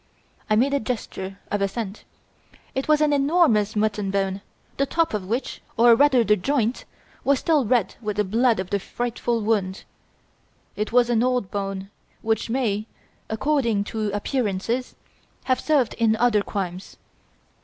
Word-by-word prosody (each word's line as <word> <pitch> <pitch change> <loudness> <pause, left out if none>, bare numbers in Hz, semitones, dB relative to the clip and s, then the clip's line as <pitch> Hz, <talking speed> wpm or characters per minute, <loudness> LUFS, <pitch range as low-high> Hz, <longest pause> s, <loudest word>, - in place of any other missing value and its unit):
(I 215 - +4
made 265 +6 +2
a 280 - +2
gesture 195 -5 -5
of 205 - 0
assent.) 200 +1 -3 0.7
"It 265 - -2
was 305 0 +4
an 300 -1 +3
enormous 275 - +3
mutton 210 -1 0
bone, 195 0 -1 0.4
the 275 - +1
top 330 -2 +1
of 200 -3 -3
which, 235 +6 -3 0.2
or 235 +1 +7
rather 260 0 +5
the 210 -1 +4
joint, 240 +3 -1 0.4
was 280 0 +3
still 300 -2 +2
red 220 -4 +1
with 210 -2 -3
the 210 - +3
blood 225 +3 +2
of 190 +1 -4
the 200 - +1
frightful 240 +2 -2
wound. 205 -3 -1 0.9
It 210 - -3
was 245 0 +4
an 230 -1 +3
old 250 -5 0
bone, 195 -1 -4 0.3
which 225 0 0
may, 225 -4 -1 0.4
according 230 -3 +1
to 215 -2 -1
appearances, 220 +2 -2 0.5
have 255 -1 +1
served 285 -7 +2
in 225 -1 +3
other 225 -2 +3
crimes. 190 -2 -5
225 Hz, 155 wpm, -24 LUFS, 205-255 Hz, 0.9 s, or